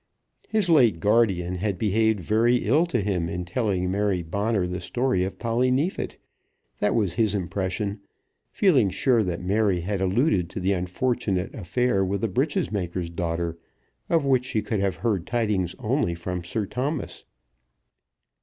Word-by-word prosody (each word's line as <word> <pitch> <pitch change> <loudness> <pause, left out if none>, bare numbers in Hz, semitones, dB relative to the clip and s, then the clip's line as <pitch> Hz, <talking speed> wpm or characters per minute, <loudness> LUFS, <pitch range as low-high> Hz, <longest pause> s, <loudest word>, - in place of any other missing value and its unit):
His 215 -4 +1
late 125 - +4
guardian 100 -3 +2
had 100 0 -1
behaved 110 +1 +2
very 115 +6 +3
ill 150 +11 +3
to 125 -10 0
him 90 -4 -1
in 90 +1 -4
telling 90 -2 -1
Mary 100 -2 0
Bonner 100 +3 0
the 90 +1 -3
story 120 -1 0
of 95 - -4
Polly 120 +2 +1
Neefit. 145 +9 -1 0.6
That 105 - +1
was 100 -7 +1
his 110 0 +1
impression, 100 +3 -2 0.5
feeling 140 - +3
sure 115 +4 +2
that 90 -2 -3
Mary 100 -1 +1
had 95 +2 -2
alluded 95 - +2
to 100 - -5
the 95 +2 +1
unfortunate 95 +1 -1
affair 110 +1 0
with 100 +1 -1
the 115 - +1
breeches 145 - 0
maker's 90 -4 -3
daughter, 85 0 -2 0.5
of 165 -4 +2
which 130 -2 +2
she 110 -4 -1
could 105 0 -1
have 95 -2 0
heard 100 -6 -1
tidings 105 -7 0
only 125 -6 0
from 90 +1 -4
Sir 100 +5 -2
Thomas. 135 +8 -3
100 Hz, 155 wpm, -25 LUFS, 90-120 Hz, 0.6 s, late